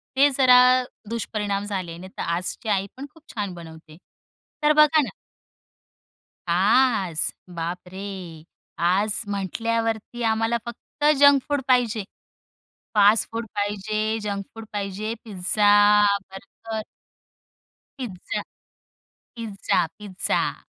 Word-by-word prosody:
ते 280 +2 +6
जरा 250 -2 +7 0.5
दुष्परिणाम 210 -3 -2
झाले. 185 -5 -4
नाही 185 +2 -11
तर - - -3
आजची 180 +6 -3
आईपण 200 +7 -2
खूप 325 -2 -20
छान 200 -4 -3
बनवते. 160 -2 -12 0.7
तर 300 0 +5
बघा 305 0 +6
ना 265 - -3 1.4
आज, 190 -1 +2 0.2
बाप 170 +2 -4
रे! 190 -5 -8 0.4
आज 195 +6 +2
म्हटल्यावरती 225 +4 -2
आम्हाला 225 +1 +1
फक्त 260 +5 -6
जंक 285 -1 +7
फूड 285 -1 +1
पाहिजे. 240 -4 +2 0.9
फास्ट 210 +2 +5
फूड 230 0 -4
पाहिजे 215 +2 -1
जंक 200 -1 -3
फूड 225 0 -9
पाहिजे, 205 +2 -3
pizza, 205 +1 +4 0.3
burger. 215 +3 -7 1.2
Pizza. 195 -8 -4 0.9
Pizza, 210 -6 -1
pizza. 195 -3 -1
210 Hz, 100 wpm, -24 LUFS, 190-230 Hz, 1.4 s, जरा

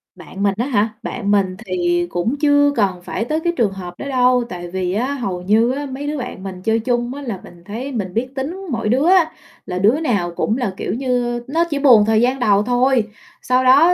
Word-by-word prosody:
Bạn 200 +1 -7
mình 200 -1 +3
á 240 - 0
hả? 220 -5 +1
Bạn 205 -5 -2
mình 195 -2 +2
thì 175 -1 0
cũng 175 +11 -1
chưa 285 -1 +4
cần 190 -5 0
phải 225 - -3
tới 310 +5 -1
cái 345 +1 -1
trường 215 -5 +2
hợp 180 -2 -7
đó - - -5
đâu, 250 -1 +3
tại 175 -1 -6
vì 185 0 -2
á, 255 +7 -1
hầu 195 -10 -3
như 220 +6 +3
á, 285 +2 -3
mấy 275 +2 -6
đứa 300 0 -2
bạn 245 -7 -6
mình 185 -2 -7
chơi 225 +3 +1
chung 240 +1 -1
á, 285 - -7
là 230 -8 -5
mình 175 -1 -15
thấy 240 +7 -5
mình 195 -7 -4
biết 240 +3 -1
tính 340 +9 -4
mỗi 230 -2 -1
đứa 265 +8 +2
á, 365 -3 +4 0.3
là 180 0 -3
đứa 225 +10 +3
nào 200 - 0
cũng 225 - 0
là, 210 -7 -2
kiểu - - -3
như, 245 -1 -1
nó 325 +5 +1
chỉ 290 -3 -1
buồn 245 -7 +6
thời 220 +1 +3
gian 255 +2 +1
đầu 205 -4 +3
thôi. 250 +1 +2 0.4
Sau 255 +1 +2
đó, 290 +8 +6
240 Hz, 235 wpm, -19 LUFS, 195-265 Hz, 0.4 s, buồn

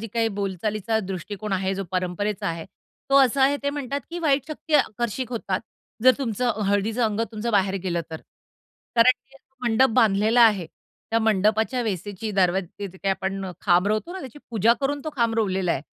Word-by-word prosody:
जी 225 - -5
काही 225 -1 +2
बोलचालीचा 205 +2 -2
दृष्टिकोन 195 +2 -5
आहे, 190 0 0
जो 195 0 -3
परंपरेचा 185 +3 -2
आहे. 165 -1 -4 0.5
तो 275 - +6
असा 265 +2 +1
आहे, 280 +2 +4
ते 285 - 0
म्हणतात, 280 -1 -3
की 350 - -4
वाईट 285 -4 +1
शक्ती 310 0 -4
आकर्षित 240 -1 +1
होतात. 200 -5 -2 0.4
जर 255 0 +8
तुमचं 235 -3 -1
हळदीचं 210 +4 +1
अंग 215 0 0
तुमचं 220 +2 -3
बाहेर 195 -1 +2
गेलं 175 -2 -1
तर 160 - -6 0.8
कारण 230 +2 +7 0.2
ते 275 - -17 0.3
मंडप 235 +2 +4
बांधलेला 220 0 +4
आहे. 200 -7 +3 0.4
त्या 225 - +3
मंडपाच्या 220 +3 +2
वेसेची 205 +1 -4
दरवाजेच्या 190 +1 0
तिथे 190 0 -13
काय 195 - +1
आपण 190 0 -3 0.2
खांब 175 +2 +3
रोवतो 215 +12 -1
ना, 380 - -6
त्याची 265 0 -9
पूजा 225 0 +4
करून 285 +1 -1
तो 310 - -3
खांब 230 -2 +2
रोवलेला 190 -5 +1
आहे. 135 - -3
215 Hz, 180 wpm, -24 LUFS, 195-245 Hz, 0.8 s, जर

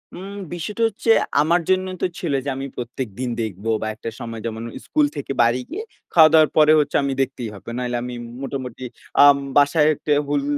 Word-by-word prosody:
উম 195 +2 -8 0.2
বিষয়টা 205 +7 -3
হচ্ছে 225 +1 0 0.3
আমার 170 +3 +2
জন্য 185 0 +2
তো - - +2
ছিল - - -2
যে, 145 - -1
আমি 135 +1 -4
প্রত্যেকদিন 125 0 -5
দেখব 105 -2 -5 0.2
বা 110 - -2
একটা 110 - -6
সময় 115 -1 -6
যেমন, 115 0 -4 0.2
স্কুল 305 -1 +2
থেকে - - -5
বাড়ি 120 +2 +2
গিয়ে 410 +6 -5 0.3
খাওয়া 160 -2 +8
দাওয়ার 155 -1 +6
পরে 155 0 +6
হচ্ছে 145 -1 -1
আমি 140 -1 -1
দেখতেই 130 -4 -3
হবে। 100 - -11
নাহলে 125 -1 -2
আমি 125 0 -5 0.3
মোটামুটি 130 -2 -6 0.4
আম 145 -1 +8 0.2
বাসায় 145 +2 +4
একটা 150 - -4 0.2
উল 145 -1 +1
140 Hz, 185 wpm, -21 LUFS, 120-160 Hz, 0.4 s, খাওয়া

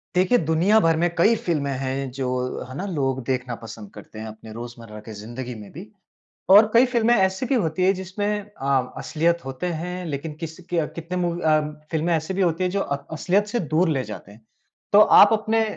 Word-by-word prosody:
देखिए, 185 +7 +4
दुनियाभर 165 +1 +3
में 175 +1 +2
कई 215 +7 +5
फ़िल्में 150 -5 -1
हैं 135 0 -3
जो 130 -1 -3 0.4
है 130 - -8
ना? 195 - -3
लोग 135 -8 -1
देखना 125 -1 -2
पसंद 110 -3 -10
करते 110 - -11
हैं 110 - -6
अपने 110 0 -11
रोज़मर्रा 115 -2 -9
की 110 - -10
ज़िंदगी 120 +4 -6
में 105 -2 -11
भी। 180 +7 -10 0.6
और 205 +3 +8
कई 235 +2 +6
फ़िल्में 240 -2 +2
ऐसी 190 +2 +1
भी 270 - +1
होती 180 -5 0
हैं 190 - +4
जिसमें 190 +2 -4 0.2
अ, 140 -10 -2
असलियत 170 +2 0
होते 135 +6 -4
हैं 180 +1 -5
लेकिन 150 0 -4
किस 160 -1 -6
के 165 -3 0
कितने 170 +2 -5
मूवी 175 -1 -1
अ, 155 -1 +3 0.3
फ़िल्में 165 +1 0
ऐसी 160 +3 -3
भी 195 - -1
होती 175 0 +1
हैं 180 - +1
जो 200 - -1
अ, 140 - -1 0.2
असलियत 190 +6 +1
से 240 +3 -1 0.2
दूर 175 +2 +3
ले 135 -4 0
जाते 105 -2 -9
हैं। 105 +3 -17 0.5
तो 205 - +8 0.2
आप 205 - +7
अपने 220 +1 +1
165 Hz, 205 wpm, -23 LUFS, 130-190 Hz, 0.6 s, और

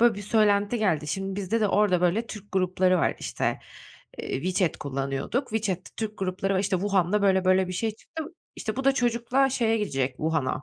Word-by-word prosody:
böyle 235 -2 +5
bir 205 - -7
söylenti 205 +1 +2
geldi. 165 -8 +1
Şimdi 195 +4 -3
bizde 205 +3 -1
de 210 - +2
orada, 200 -4 +3
böyle, 185 +6 +1
Türk 210 -1 -10
grupları 185 -1 +2
var, - - +1
işte, - - -2 0.6
eee, - - -4
WeChat 185 -1 0
kullanıyorduk. 140 - -2
WeChat'te 205 -5 -2
Türk 215 -1 -4
grupları 190 +1 -1
var, - - +2
işte, 190 -1 +1
Wuhan'da, 195 +1 +1
böyle, 190 -1 +3
böyle 185 0 +3
bir - - -4
şey 220 +5 -1
çıktı, 320 +4 -7 0.3
işte, 215 +2 -4
bu 270 - -3
da 275 - +5
çocukla 245 +2 +1
şeye 225 -3 +1
gidecek, 135 -11 0
Wuhan'a. 150 -2 -1
195 Hz, 190 wpm, -26 LUFS, 185-220 Hz, 0.6 s, böyle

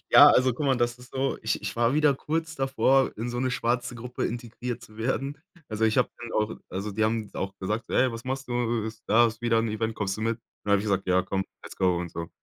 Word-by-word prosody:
Ja, - - +10
also, 130 0 +4
guck 145 +3 -2
mal, 135 -2 +3
das 120 0 0
ist 125 0 -14
so, 135 +1 -1
ich 110 - 0
ich 105 +2 -4
war 120 +3 +3
wieder 150 -2 +4
kurz 160 +3 -2
davor, 135 -1 +2
in 115 +3 -3
so 120 - -3
'ne 130 - +1
schwarze 120 -2 -1
Gruppe 125 +1 -4
integriert 120 0 -4
zu 110 - -14
werden. 135 +5 -2 0.3
Also, 110 0 0
ich 110 -1 +3
habe - - +3
dann 120 -1 -7
auch 105 0 0
also, 100 +3 -4
die 110 +2 +1
haben 110 -1 -1
auch 95 0 -3
gesagt, 105 +4 -2
so: - - -9
„Ey, 130 0 +4
was 115 +2 -7
machst 135 +1 -3
du? 120 -2 0 0.2
Da 120 +2 +6
ist 115 +1 -5
wieder 115 -1 +3
'n 115 0 +1
Event, 110 +1 -2
kommst 100 -2 -2
du - - -6
mit?“ 115 +1 0 0.3
Dann 100 - +1
habe 100 - +5
ich - - -5
gesagt: 100 -2 0
„Ja, 90 0 +3
komm, 95 0 -2 0.2
let's - - -10
go“ 90 -2 +2
und 85 -1 -4
so. 85 0 -5
115 Hz, 260 wpm, -27 LUFS, 105-125 Hz, 0.3 s, Ja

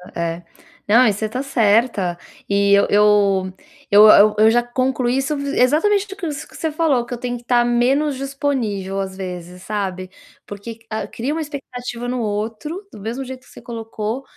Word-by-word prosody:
É. 170 0 -3 0.4
Não, 235 +4 +6
e 215 - +4
você 215 +2 -3
tá 250 +4 -4
certa 220 -7 +1 0.3
e 200 0 +2
eu 200 - +5
eu 200 -2 +3 0.4
eu 210 +1 +8
eu 210 0 +7
eu 220 +1 +6
já 240 +1 +3
concluí 255 0 0
isso 270 +2 -1
exatamente 295 +9 +2 0.2
isso 295 -4 -4
que - - -17
você 320 - -2
falou, 295 -6 +1
que 245 - -7
eu - - -9
tenho 245 0 -3
que 235 - -15
tá 240 0 +2
menos 265 +5 +2
disponível 260 -9 -2
às 190 -1 -4
vezes, 180 -1 -7
sabe, 190 -3 -4 0.3
porque 210 +3 -8
a 220 0 -3
cria 260 +6 -3
uma 325 - -2
expectativa 250 -5 -6
no 250 0 -2
outro, 225 - -4
do - - -10
mesmo 235 +6 -4
jeito 260 0 -8
que - - -19
você - - -13
colocou, 225 +1 -5
235 Hz, 180 wpm, -20 LUFS, 205-265 Hz, 0.4 s, eu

